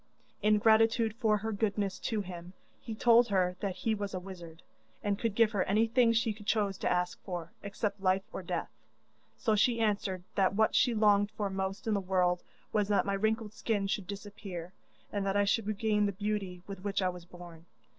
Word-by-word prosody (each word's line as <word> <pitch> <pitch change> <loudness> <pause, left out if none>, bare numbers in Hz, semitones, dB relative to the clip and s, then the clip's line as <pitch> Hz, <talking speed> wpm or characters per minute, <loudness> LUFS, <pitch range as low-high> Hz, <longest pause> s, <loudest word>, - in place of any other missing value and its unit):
In 210 +1 +4
gratitude 225 +1 +4
for 215 -3 +3
her 220 +2 -3
goodness 200 -2 -1
to 220 -2 -1
him, 180 -1 -8 0.3
he 225 - -6
told 235 +2 +5
her 185 -3 +1
that 195 -2 -2
he 220 +4 -1
was 200 -2 -3
a - - -2
wizard 175 -3 -10 0.4
and 205 -1 0
could 225 -4 -1
give 230 -1 +4
her 200 -4 +1
anything 230 +4 +3
she 230 -1 +1
chose 205 -1 0
to - - 0
ask 180 0 -1
for, 175 -3 -5
except 200 0 -3
life 190 0 +2
or - - -4
death, - - -3 0.7
so 220 -3 +1
she 230 +3 +3
answered 200 -4 0
that 195 -1 +2
what 220 +1 +3
she 245 -3 +3
longed 205 -1 +4
for 210 -2 -3
most 190 0 -3
in 220 - +1
the 200 - +1
world 180 -1 +1 0.3
was 210 -2 +2
that 205 -1 +2
my 200 - 0
wrinkled 220 +1 0
skin 210 -3 -1
should 195 -1 -2
disappear, 195 -3 -7 0.4
and 205 -1 -1
that 195 0 0
I 205 - +3
should 205 +1 +1
regain 210 0 +1
the 200 - -2
beauty 195 -3 -3
with 195 -2 -8
which 200 -1 -1
I 185 - +2
was 180 -1 -8
born. 175 -2 -13
200 Hz, 200 wpm, -31 LUFS, 190-215 Hz, 0.7 s, told